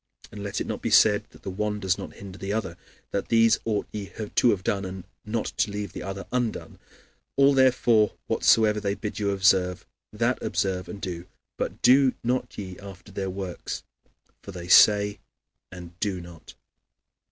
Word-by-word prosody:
And 105 - -8
let 100 0 -3
it - - -2
not - - -4
be - - -1
said - - +5
that - - -19
the 95 - -4
one 105 +2 -2
does 95 -2 +1
not - - -7
hinder 100 -1 -10
the 95 +1 -4
other, 105 -6 -2 0.4
that 100 - -2
"These 115 0 +4
ought 110 -2 0
ye 105 -2 -6 0.2
to 125 - +4
have 95 -5 +1
done, 100 0 0
and 95 -1 -6 0.2
not 110 +1 -3
to - - +2
leave 100 -2 -5
the - - -6
other 95 +1 -6
undone." 125 -3 -3 0.6
"All, 140 0 +5
therefore, 125 -5 +4
whatsoever 110 -1 +3
they 100 -1 -1
bid 105 -1 -5
you 100 -1 0
observe, 95 -2 +2 0.3
that - - 0
observe 90 -2 -1
and 100 - -7
do; 90 -2 -5 0.3
but - - -4
do 130 +1 +5
not 125 +2 -1
ye 95 -3 -7
after 100 0 -11
their 95 0 -3
works: 95 -1 -5 0.6
for - - -9
they 90 -1 -8
say, 105 +2 +6 0.5
and 90 -2 -10
do 100 -4 -1
not" 85 0 -10
(Matt. 80 - -18
xxiii. - - -13
100 Hz, 185 wpm, -26 LUFS, 95-110 Hz, 0.6 s, say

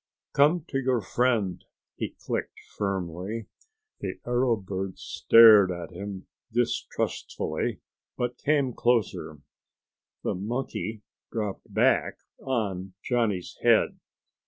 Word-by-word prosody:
"Come 150 +4 +4
to 135 - 0
your 130 -2 +1
friend," 110 -3 0 0.3
he - - -4
clicked - - -3 0.2
firmly. 95 +2 -3 0.5
The - - -4
arrow 120 0 +2
bird 95 -2 -5
stared 110 -4 +7
at 85 -1 -6
him 95 +1 -7 0.3
distrustfully, 120 +1 -2 0.4
but 125 0 -2
came 140 -4 +2
closer. 110 - 0 0.8
The - - 0
monkey 110 +1 -4 0.3
dropped 105 -4 -4
back - - +3 0.2
on 95 -8 -2
Johnny's 115 -7 -1
head. - - +3
110 Hz, 100 wpm, -27 LUFS, 95-125 Hz, 0.8 s, stared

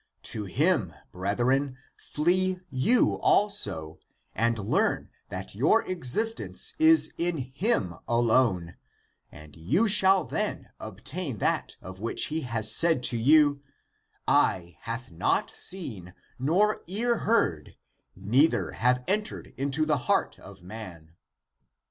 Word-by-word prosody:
To 105 -2 -4
him, 130 - 0 0.2
brethren, 125 +9 -1 0.2
flee 185 +4 -1
you 140 - +2
also, 95 - +1 0.3
and 115 0 0
learn 105 -1 -1 0.2
that - - -6
your 145 - +2
exis 185 - +1
tence - - -3
is 320 0 +5
in 170 0 0
him 130 - -1
alone, 115 -7 +1 0.5
and 75 -1 -14
you 145 - +1
shall 195 -3 +5
then - - -4
obtain 125 - -6
that - - -1
of 95 0 -10
which 115 +3 +1
he 160 -1 -2 0.2
said 130 +6 +3
to 120 - 0
you: 145 +3 +4 0.3
" - - -45 0.2
Eye 85 -2 +1
hath 115 0 -5
not 85 - 0
seen, 110 - -4 0.2
nor 185 +11 +1
ear 230 +5 -1
heard, 85 - 0 0.4
neither 120 - +1
have 125 +2 +1
entered 210 +2 -3
into 140 +3 0
the 150 -2 +1
heart - - +1
of - - -14
man." 90 -6 -10
130 Hz, 120 wpm, -27 LUFS, -, 0.5 s, is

